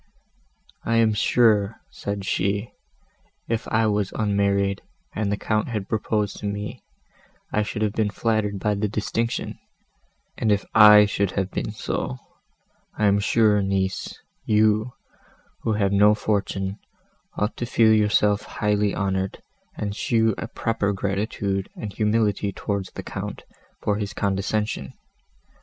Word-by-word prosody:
"I 115 - 0
am 115 -1 +4
sure," 110 -1 +3
said 100 -1 -5
she, 100 +3 -1 0.8
"if 115 -1 -2
I 110 0 +2
was 105 -2 0
unmarried, 100 -2 +1 0.3
and 105 -2 -1
the 100 - 0
Count 110 0 0
had 105 -5 -3
proposed 105 -1 -1
to 105 - -4
me, 105 +1 -5 0.7
I 105 - +2
should 105 0 -2
have 105 -1 0
been 110 -2 +1
flattered 105 0 0
by 105 +2 0
the 105 +1 -1
distinction: 110 +3 -2 0.8
and 110 - +2
if 100 -1 +1
I 105 -1 +9
should 100 -2 -1
have 95 -1 -1
been - - -3
so, 65 - -3 0.8
I 105 - +1
am 100 0 +4
sure, 105 0 +3
niece, 95 -1 -2 0.2
you, 110 +2 +2 0.7
who 110 - 0
have 100 -2 +1
no 105 +1 +5
fortune, 100 -2 -2 0.6
ought 105 +2 -1
to 120 - -3
feel 110 -1 +4
yourself 105 -1 +3
highly 105 -1 0
honoured, 95 0 -2 0.3
and 100 -1 -3
show 110 0 +2
a - - -4
proper 115 -4 -1
gratitude 100 0 -2
and 105 -3 -6
humility 105 -2 +1
towards 100 -1 -3
the - - -8
Count, - - -6 0.4
for 105 -1 +1
his 105 -1 -4
condescension. 100 -7 -1
105 Hz, 140 wpm, -24 LUFS, 100-110 Hz, 0.8 s, I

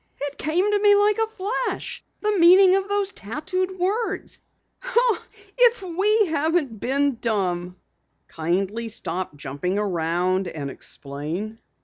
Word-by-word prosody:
"It 285 0 -5
came 360 +7 +1
to 415 - +2
me 410 0 +6
like 415 +1 +3
a 445 - +2
flash 440 +3 -4 0.2
the 425 0 +1
meaning 370 +2 +7
of 390 0 -1
those 405 -1 0
tattooed 370 - -3
words! 395 +3 -2 1.2
If 485 -3 +5
we 405 +5 +2
haven't 310 - 0
been 275 +1 0
dumb!" 180 -5 -1 0.5
"Kindly 195 +8 -2
stop 185 -6 -5
jumping 145 +7 -3
around, 185 -1 0
and 145 -5 -5
explain." 160 +15 -6
285 Hz, 120 wpm, -23 LUFS, -, 1.2 s, meaning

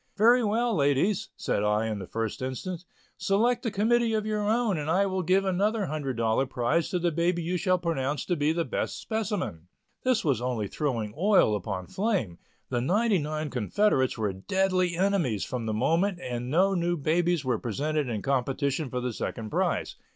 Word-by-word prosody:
"Very 235 +4 +5
well, 225 +2 +1
ladies," 145 +7 +1
said 100 - -1
I 105 +1 +2
in 110 -2 -2
the 95 - -7
first 115 0 -3
instance, 165 +8 -4 0.3
"select 230 +6 +1
a - - +2
committee 225 +2 +2
of 215 -1 -1
your 215 -1 -1
own 215 -3 +1
and 150 +1 -3
I 190 +4 +3
will 190 -1 -1
give 185 +3 +2
another 200 +3 +1
$100 130 -5 -1
prize 130 +7 0
to 185 - 0
the 175 -1 +1
baby 170 +2 0
you 175 +3 -1
shall 185 0 +2
pronounce 145 -5 -2
to 175 - 0
be 150 0 +1
the 165 0 -1
best - - -3
specimen." 210 - -3 0.3
This 255 -6 +1
was 135 -6 +1
only 120 -5 -1
throwing 115 -6 -2
oil 190 - +4
upon 95 -2 -4
flame; 180 - -1 0.3
the 120 -2 0
ninety 205 - +2
nine 155 0 -3
confederates 130 - +1
were 105 -3 -1
deadly 185 - 0
enemies 175 - +1
from 120 -3 -4
the - - 0
moment 170 - +1
and 125 -5 -4
no 185 +7 +3
new 175 -1 0
babies 165 +1 +1
were 125 -3 0
presented 145 +5 -1
in 110 -3 -3
competition 135 +2 0
for 125 0 -3
the 125 -1 -2
second 110 0 -5
prize. - - -1
160 Hz, 185 wpm, -27 LUFS, 125-195 Hz, 0.3 s, Very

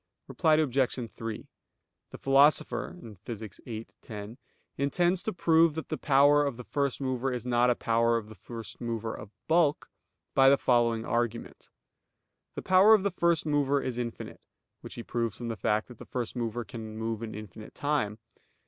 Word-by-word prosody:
Reply 160 -3 +3
Obj. 130 -5 0
3: 115 -1 -6 0.6
The - - -9
Philosopher 135 -5 +3 0.3
(Phys. 110 -4 -8
viii, 115 -1 -6 0.2
10) 105 +3 -8 0.4
intends 175 +6 +1
to 220 - -2
prove 165 -3 +3
that 160 - -5
the - - -2
power 145 +1 +5
of 140 -5 -2
the 125 - -7
first 140 +1 -1
mover 130 -1 -1
is 125 -2 -4
not 120 0 +3
a 120 - +3
power 115 0 +2
of 110 -2 -5
the 110 - -11
first 115 +3 -10
mover 115 -2 -3
of 105 - -9 0.2
bulk, 160 -2 +2 0.4
by 135 0 +6
the 140 - +5
following 115 -3 +2
argument. 120 -1 -3 0.9
The - - -5
power 190 +4 +7
of 200 - 0
the 200 - 0
first 170 -2 +1
mover 145 -2 +2
is 125 -3 -3
infinite 120 -1 -6 0.4
(which - - -10
he 120 - -6
proves 115 -3 -2
from 120 -1 -5
the 115 - -3
fact 105 +1 0
that 125 -3 -13
the - - -9
first 125 -2 -4
mover 120 0 -2
can 110 -2 -8
move 110 0 -3
in 110 -2 -6
infinite 105 0 -10
time). 145 -8 -1
120 Hz, 175 wpm, -29 LUFS, 115-145 Hz, 0.9 s, power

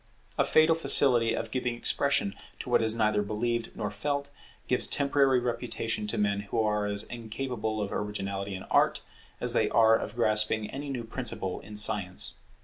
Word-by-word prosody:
A - - +2
fatal 155 +1 +4
facility 125 -7 +5
of 115 - -5
giving 125 -1 -2
expression 140 -3 +1 0.2
to - - -7
what - - +4
is 110 0 +1
neither 110 -2 +1
believed 115 +3 -2
nor 105 -2 -4
felt, 140 +7 -3 0.4
gives - - +3
temporary 140 -2 +2
reputation 115 -3 -3
to 115 - -2
men 100 -1 0
who 100 +3 -4
are 105 -1 0
as 100 0 +1
incapable 115 -1 -5
of 100 -1 -3
originality 100 -1 -4
in 95 - -8
Art - - +1 0.4
as - - -1
they - - +1
are 115 -1 +5
of 110 - -4
grasping 110 -2 +1
any 140 +1 -6
new 125 -4 -4
principle 110 -5 -4
in 105 - -11
science. 100 -3 +1
110 Hz, 170 wpm, -28 LUFS, 105-125 Hz, 0.4 s, facility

